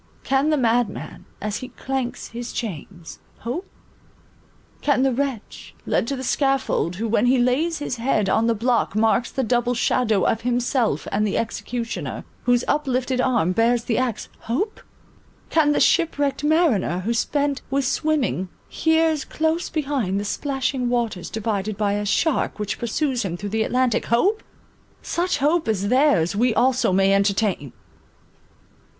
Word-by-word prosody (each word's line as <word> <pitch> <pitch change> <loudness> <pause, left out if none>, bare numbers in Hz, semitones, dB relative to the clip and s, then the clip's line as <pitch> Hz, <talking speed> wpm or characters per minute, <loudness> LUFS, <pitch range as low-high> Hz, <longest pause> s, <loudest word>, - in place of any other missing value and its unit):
Can 270 +3 +2
the 305 - +2
madman, 230 -7 -1 0.2
as 210 0 -2
he 255 - -7
clanks 260 0 -4
his 235 +1 -6
chains, 175 - -6 0.2
hope? 255 - -4 1.1
Can 275 -3 +2
the 270 -1 +2
wretch, 265 -4 -4
led - - 0
to 275 - -1
the 260 - -6
scaffold, 270 - 0
who 225 +5 -2
when 235 +2 +2
he 260 +1 +4
lays 270 +7 +1
his 290 -4 -4
head 230 -4 +1
on 225 +4 +2
the 230 - +2
block, 235 -1 0
marks 225 +2 +2
the 265 - -2
double 245 +1 +1
shadow 220 -4 +1
of 225 - +1
himself 245 0 0
and 200 - 0
the 200 - -1
executioner, 230 +1 -4 0.2
whose 245 0 +3
uplifted 260 -3 0
arm 235 -10 +2
bears 230 +4 +2
the 230 -1 0
axe, 245 -5 -2
hope? 360 - -3 0.7
Can 310 -2 +4
the - - +2
ship 335 -3 +3
wrecked 285 0 -1
mariner, 295 - +2
who 225 +5 -1
spent 285 +4 0
with 275 0 0
swimming, 265 - 0 0.2
hears 320 -2 +1
close 320 +2 -1
behind 270 - -1
the 205 - -4
splashing 265 +1 -1
waters 230 -7 -1
divided 210 -2 -2
by 205 -1 +1
a 205 0 -2
shark 320 +8 +1
which 210 -1 -3
pursues 250 +2 -1
him 175 -3 -3
through 205 +3 -5
the 220 +2 -1
Atlantic, 250 +1 +1
hope? 390 - +2 0.6
Such 355 +1 -1
hope 310 +3 +1
as 200 -2 0
theirs, 255 - +3
we 235 +2 +2
also 250 -3 +3
may 195 +1 +3
entertain! 200 - +1
245 Hz, 155 wpm, -22 LUFS, 215-275 Hz, 1.1 s, he